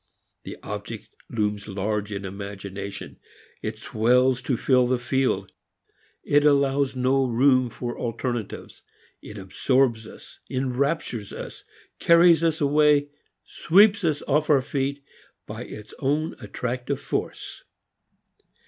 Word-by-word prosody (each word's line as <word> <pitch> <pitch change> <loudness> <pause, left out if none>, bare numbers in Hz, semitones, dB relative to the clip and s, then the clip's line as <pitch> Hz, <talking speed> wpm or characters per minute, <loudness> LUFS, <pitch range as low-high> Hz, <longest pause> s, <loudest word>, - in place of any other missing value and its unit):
The - - -7
object - - -7 0.2
looms 105 -2 -2
large 105 +1 -2
in 100 -1 -4
imagination; 100 0 -7 0.4
it - - -4
swells 125 +3 +2
to 125 - -1
fill 125 0 +3
the 130 0 +1
field. 120 -6 -1 0.7
It 145 0 +3
allows 140 -2 +2
no 130 +1 +2
room 130 +1 +3
for 120 +1 -6
alternatives; 120 -1 -4 0.4
it 105 - -10
absorbs 115 +4 +1
us, - - -13
enraptures 130 -3 -2
us, - - -8 0.4
carries 170 0 +6
us 165 -1 +1
away, 145 0 +3 0.3
sweeps 200 +4 +4
us 155 -3 0
off 150 +2 +1
our 140 -3 +4
feet 140 +1 -2 0.4
by - - -7
its 105 0 -10
own 150 +3 0
attractive 125 0 -4
force. - - -5
130 Hz, 115 wpm, -24 LUFS, 110-145 Hz, 0.7 s, carries